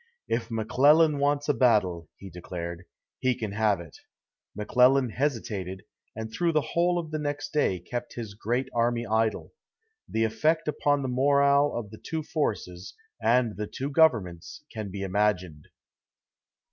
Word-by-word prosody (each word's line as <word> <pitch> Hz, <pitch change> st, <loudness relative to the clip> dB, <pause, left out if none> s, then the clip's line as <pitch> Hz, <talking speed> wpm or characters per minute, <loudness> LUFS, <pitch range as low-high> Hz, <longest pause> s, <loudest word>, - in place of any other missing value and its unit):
"If 115 Hz, 0 st, -2 dB
McClellan 145 Hz, +7 st, +4 dB
wants 145 Hz, 0 st, +1 dB
a 145 Hz, -, +3 dB
battle," 95 Hz, -, +2 dB
he 95 Hz, -1 st, -11 dB
declared, 85 Hz, 0 st, -7 dB, 0.3 s
"he 130 Hz, -1 st, +1 dB
can 110 Hz, -4 st, -4 dB
have 105 Hz, -2 st, +1 dB
it." 85 Hz, -4 st, -12 dB, 0.6 s
McClellan 125 Hz, +4 st, +3 dB
hesitated, 105 Hz, -9 st, -3 dB, 0.3 s
and 110 Hz, 0 st, -6 dB
through 170 Hz, -1 st, +1 dB
the 155 Hz, -2 st, 0 dB
whole 175 Hz, +1 st, +2 dB
of 165 Hz, -3 st, -4 dB
the 155 Hz, -, -2 dB
next 145 Hz, 0 st, -4 dB
day 145 Hz, -11 st, +2 dB
kept 120 Hz, +8 st, -6 dB
his 110 Hz, -4 st, -6 dB
great 120 Hz, +5 st, -2 dB
army 120 Hz, 0 st, +1 dB
idle. 110 Hz, 0 st, 0 dB, 0.6 s
The 110 Hz, -, 0 dB
effect 135 Hz, +10 st, +1 dB
upon 145 Hz, -1 st, +1 dB
the -, -, -2 dB
morale 140 Hz, +2 st, +3 dB
of 110 Hz, -4 st, -5 dB
the 110 Hz, -, -11 dB
two 160 Hz, -1 st, -3 dB
forces, 100 Hz, -, -3 dB, 0.3 s
and 120 Hz, -2 st, +2 dB
the 105 Hz, 0 st, -3 dB
two 135 Hz, +6 st, -5 dB
governments, 110 Hz, -, +1 dB
can 110 Hz, -3 st, -5 dB
be 100 Hz, +1 st, -5 dB
imagined. 95 Hz, -6 st, -1 dB
115 Hz, 150 wpm, -27 LUFS, 100-145 Hz, 0.6 s, McClellan